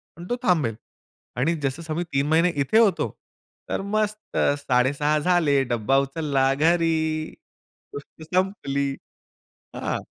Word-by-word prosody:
पण 170 - -10
तो 245 - +1
थांबेल 150 - +2 0.6
आणि 160 +7 +1
जसं 135 +5 -2
समय 160 +2 -3
3 140 +1 +1
महिने 165 +3 +3
इथे 175 +11 +1
होतो, 215 -6 +3 0.6
तर - - -1
मस्त 215 0 -2 0.2
6.30 145 +3 +1
झाले, 150 -4 +2
डब्बा 120 +1 +1
उचलला 135 -2 0
घरी, 160 0 +1 0.6
गोष्ट 145 +3 -10
संपली, 140 -8 0 0.8
हां. - - -2
155 Hz, 120 wpm, -24 LUFS, 135-170 Hz, 0.8 s, महिने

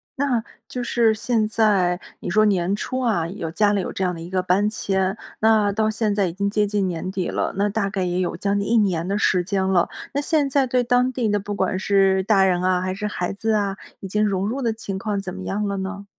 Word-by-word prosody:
那 260 -5 0 0.2
就 250 - -4
是 235 -2 +3
现 220 0 0
在 205 -5 +2 0.2
你 - - -5
说 215 +4 +4
年 195 -2 +2
初 255 +5 -3
啊 220 -10 +1
有 170 -1 -5
家 205 +5 +2
里 205 - +1
有 - - -4
这 190 - -2
样 180 - 0
的 165 - -8
一 170 +2 -8
个 185 -1 0
搬 195 +3 +2
迁， 190 -1 -1 0.2
那 215 -2 +4
到 215 +1 +1
现 215 -1 0
在 200 -2 +1
已 170 - -4
经 200 +2 -1
接 210 0 +1
近 205 -1 0
年 175 +1 -4
底 190 -2 -2
了， - - -1
那 200 +2 +1
大 200 -1 -1
概 195 -2 -2
也 180 0 -1
有 180 - -1
将 200 0 0
近 200 - -2
1 235 - +2
年 185 -6 +2
的 200 +2 0
时 185 -3 +2
间 190 0 0
了， 185 -2 +2 0.3
那 280 - 0
现 290 -1 +1
在 270 -1 +2
对 250 0 +1
当 245 +1 +2
地 235 -4 0
那 205 - +1
不 205 +1 -5
管 190 -1 0
是 195 -1 +3
大 195 -1 +4
人 180 -2 +2
啊 180 0 +2
还 185 0 -2
是 210 +2 -3
孩 180 -4 -3
子 220 +3 -1
啊， 200 -2 0 0.2
已 195 - -6
经 210 +2 +1
融 195 -1 -1
入 265 +4 -3
的 230 -3 0
情 200 -3 -5
况 200 0 -2
怎 185 -2 -6
么 190 0 -7
样 210 +1 -2
了 200 0 -2
呢？ 200 +1 -5
200 Hz, 275 characters per minute, -22 LUFS, 190-220 Hz, 0.3 s, 说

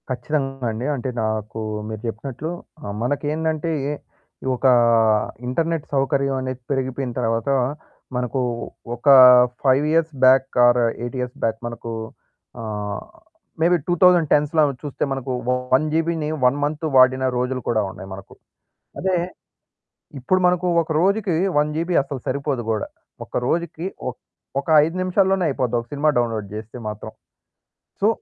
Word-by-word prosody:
కచ్చితంగా 135 0 -2
అండి. 110 +3 -4
అంటే 130 0 -4
నాకు 110 0 -3 0.3
మీరు 110 -1 -6
చెప్పినట్లు 130 +7 -5 0.3
ఆహ్, 100 - -5
మనకేందంటే, 155 +4 -1 0.2
ఎ - - -1 0.6
ఒక 125 - -6 0.8
ఇంటర్నెట్ 165 +4 -1
సౌకర్యమనేది 135 -2 0
పెరిగిపోయిన 130 -1 -2
తర్వాత, 115 +1 -1 0.7
మనకు 125 +2 -1 0.6
ఒక 120 - -10 0.6
5 135 +1 +3
years 165 -1 +2
back, 130 +1 +6 0.2
are 120 0 +4 0.2
8 120 +2 -4
years 125 0 -4
back 110 0 0
మనకు 120 0 -7 0.7
ఆహ్, 105 -2 -4 0.6
మేబీ 175 +2 +4
2010స్‌లో 165 -4 +4 0.2
చూస్తే 145 -2 -3
మనకు 135 -1 -3 0.4
1 155 - +2
జీబీని 165 -1 0 0.2
1 125 +3 +3
మంత్ 150 +2 -2
వాడిన 130 0 +5
రోజులు 125 +1 -1
కూడా 110 -2 +2
ఉన్నాయి 95 +1 -10
మనకు. 95 0 -11 0.7
అదే 190 0 +1 1.0
ఇప్పుడు 185 +9 +1
మనకు 180 0 +1
ఒక 160 - -5
రోజుకి 195 0 +1 0.2
1 150 +1 +3
జీబీ 170 +3 -1
అసలు 140 -1 -6
సరిపోదు 140 -2 -1
కూడా. 110 -2 -2 0.4
ఒక - - -4
రోజుకి 170 +1 -2 0.2
ఒక్ 125 - -10 0.4
ఒక 140 - -7 0.2
5 165 +3 -2
నిమిషాల్లోనే 190 0 +2
అయిపోద్ది 125 -3 -1
ఒక 115 - -8
సినిమా 145 +2 +2
డౌన్‌లోడ్ 115 -3 0
చేస్తే 110 +3 -8
మాత్రం. 105 0 -6 0.9
సో, 205 - +4
135 Hz, 130 wpm, -22 LUFS, 120-160 Hz, 1.0 s, back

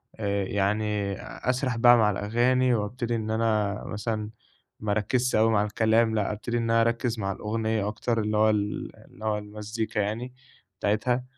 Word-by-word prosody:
آآ 100 -2 -1
يعني 100 0 0 0.4
أسرح 125 -2 0
بقى 120 +1 +7
مع 110 -2 +4
الأغاني، 120 +5 +2
وأبتدي 115 +2 -2
إن 110 -1 -3
أنا 110 -2 0
مثلًا 105 0 -3 0.5
ما 105 -1 -2
أركّزش 120 +5 +1
أوي 110 +1 +4
مع 105 -1 +3
الكلام، 110 +1 +2
لأ 105 -1 0
أبتدي 115 +3 -3
إن 115 - 0
أنا 115 0 +3
أركّز 115 0 0
مع 100 -1 -1
الأغنية 110 0 -1
أكتر، 115 +2 -1
اللي 105 0 0
هو 110 0 +5
ال 105 -1 -2
اللي 110 - -12
هو 105 -1 +1
المزيكا 105 +1 -4
يعني 115 +5 -2 0.5
بتاعتها 120 +5 +1
110 Hz, 165 wpm, -26 LUFS, 105-115 Hz, 0.5 s, بقى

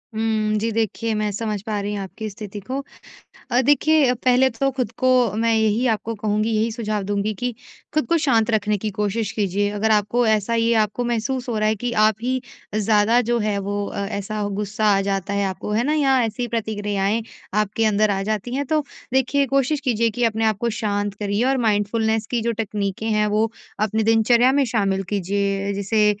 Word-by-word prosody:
हुँ, 220 -1 0
जी, 225 +2 -1
देखिए 225 +1 -1
मैं 210 0 0
समझ 210 0 -3
पा 215 -2 -2
रही 205 +1 -3
हूँ 200 - -3
आपकी 215 +3 -6
स्थिति 205 0 -8
को। 255 +8 -4 0.7
अ, 245 - +4
देखिए 290 -1 +4
पहले 255 +1 +3
तो 260 +3 0
खुद 255 -4 -2
को, 255 -3 +3
मैं 230 +1 +1
यही 220 +2 +2
आपको 225 0 -1
कहूँगी, 215 +1 0
यही 225 +1 +1
सुझाव 215 -3 -2
दूँगी 205 +2 -1
कि 245 +5 -3 0.4
खुद 310 0 +1
को 335 - +3
शांत 235 -8 +2
रखने 210 -1 +1
की 215 +2 -3
कोशिश 210 +1 -2
कीजिए। 205 -1 0
अगर 210 +2 0
आपको 215 +3 +2
ऐसा 220 +1 +1
ये 230 0 +2
आपको 215 +3 -2
महसूस 240 +2 -2
हो 230 - -1
रहा 215 0 +2
है 215 - +1
कि 245 +4 -3 0.2
आप 215 - +1
ही 255 +2 -1 0.3
ज़्यादा 215 +2 +3
जो 240 - +3
हैं 210 -2 0
वो 205 +1 -2
अ, - - -7
ऐसा 205 +1 -4
गुस्सा 210 +1 -2
आ - - +2
जाता 195 0 -2
है 200 0 +1
आपको, 190 +2 -4
है 220 +3 +1
ना, 295 +4 +1
या 270 -4 +3
ऐसी 240 +2 -2
प्रतिक्रियाएँ 210 -2 -1 0.4
आपके 215 +2 -1
अंदर 215 0 +3
आ 195 -1 -1
जाती 215 +3 -3
हैं, 285 +1 -1
तो 305 +2 +1 0.3
देखिए 265 +2 +2
कोशिश 275 +2 +2
कीजिए 235 -4 +1
कि 240 +3 -3
अपने 225 -1 +1
आप 215 -2 +1
को 235 +3 -1
शांत 205 -1 -1
करिए। 205 +2 0
और 270 +1 +2
माइंडफुलनेस 220 +1 +1
की 240 -2 0
जो 235 +1 0
तकनीकें 205 -1 -2
हैं, 210 -1 +2
वो 215 +2 +1 0.3
अपने 220 +1 +1
दिनचर्या 235 +3 +4
में 280 +1 +3
शामिल 195 -2 +1
कीजिए 200 0 -1
जैसे 205 +2 +1
220 Hz, 200 wpm, -22 LUFS, 205-235 Hz, 0.7 s, अ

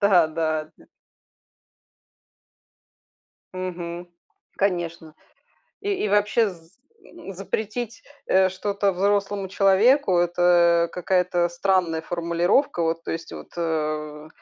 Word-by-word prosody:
Да-да-да. 160 -5 +1 2.7
Мгм, 175 -1 -5 0.5
конечно, 170 -5 -2 0.7
и 410 - -3
и - - 0
вообще 210 +2 +2
з 165 0 -16 0.5
запретить, 215 - -4 0.2
э, 190 0 +4
что-то 200 +1 -1
взрослому 200 +1 0
человеку- 195 +2 +3
это 175 -1 +3
какая-то 180 -1 +1
странная 175 -2 0
формулировка. 170 - 0
Вот 165 0 -1
то - - -3
есть 165 0 -6
вот, - - -9
э, 155 -2 -3
175 Hz, 85 wpm, -24 LUFS, 165-200 Hz, 2.7 s, э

